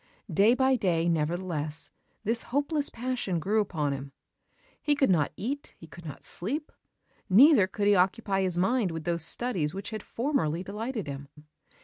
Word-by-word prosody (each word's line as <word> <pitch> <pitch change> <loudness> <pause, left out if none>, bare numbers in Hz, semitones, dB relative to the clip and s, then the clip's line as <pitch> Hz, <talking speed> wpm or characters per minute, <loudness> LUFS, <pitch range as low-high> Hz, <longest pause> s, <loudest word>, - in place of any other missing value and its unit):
Day 210 +8 +5
by 260 0 +3
day, 175 -6 +1
nevertheless, 160 -1 -2 0.3
this 230 +2 0
hopeless 290 +2 0
passion 240 -7 -2
grew 210 +6 +1
upon 155 -8 -1
him. 140 0 -7 0.7
He 295 - +2
could 270 -6 +3
not 155 -5 +2
eat; 280 +7 -4
he - - -12
could 165 +1 -13
not 150 - -8
sleep: 280 - -4 0.6
neither 230 - +7
could 200 +1 -2
he 205 - +5
occupy 195 +1 +2
his 185 -2 0
mind 210 +3 +2
with 165 -1 -5
those 170 -1 +1
studies 175 -5 0
which 195 +3 -5
had 215 -1 -4
formerly 215 - -1
delighted 215 +3 -4
him. 140 0 -7
195 Hz, 160 wpm, -28 LUFS, 165-240 Hz, 0.7 s, neither